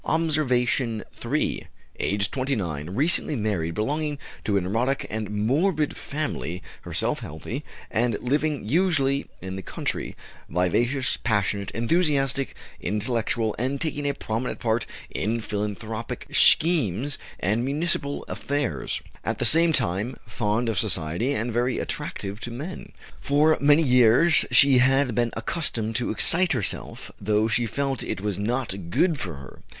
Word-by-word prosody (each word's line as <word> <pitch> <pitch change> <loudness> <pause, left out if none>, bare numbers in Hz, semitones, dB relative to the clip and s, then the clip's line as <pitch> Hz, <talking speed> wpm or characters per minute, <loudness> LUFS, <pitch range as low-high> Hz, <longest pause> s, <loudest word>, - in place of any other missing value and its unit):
OBSERVATION 130 -7 +1 0.2
III. 140 +6 -1 0.3
Aged 100 0 0
29, 95 - -2
recently 150 - +4
married, 95 -8 -1
belonging 150 +6 -1 0.3
to 100 -2 +1
a - - +2
neurotic 115 +9 0
and 110 -1 -3
morbid 145 - +1
family, 140 - -4 0.2
herself - - -1
healthy, 110 - -6 0.3
and 115 -1 +1
living 145 -1 -1
usually 140 - +2 0.2
in 95 0 -5
the - - -5
country; - - -4 0.3
vivacious, 120 - +1
passionate, 100 -3 0
enthusiastic, 135 0 +1 0.2
intellectual, 110 +2 -1
and 130 +3 -1
taking 145 -2 -2
a 140 - -2
prominent 115 +3 -3
part 115 0 0 0.2
in 115 +4 -1
philanthropic 110 +1 -4
schemes 145 - +3 0.2
and 110 +5 0
municipal 140 +1 -1
affairs; 145 -2 -2 0.2
at - - -2
the - - -1
same 165 +1 +6
time, 115 - -1
fond 110 +1 -1
of 110 -4 0
society, 95 - 0
and 120 -3 -2
very 120 +2 +1
attractive 100 +2 -4
to 120 - -5
men. 145 +10 -7 0.3
For 150 +2 +3
many 145 +3 +5
years 125 +4 +5
she 130 +1 +6
had 135 0 +3
been 120 +2 +1
accustomed 115 -3 -1
to 125 - -1
excite 175 +10 +5
herself, 110 -9 -3
though 105 +2 +2
she 115 +1 +1
felt 135 +3 -2
it - - -3
was 100 -1 -2
not 105 -5 -2
good 165 - +2
for 90 -9 -4
her. 70 -1 -12
120 Hz, 135 wpm, -25 LUFS, 105-140 Hz, 0.3 s, same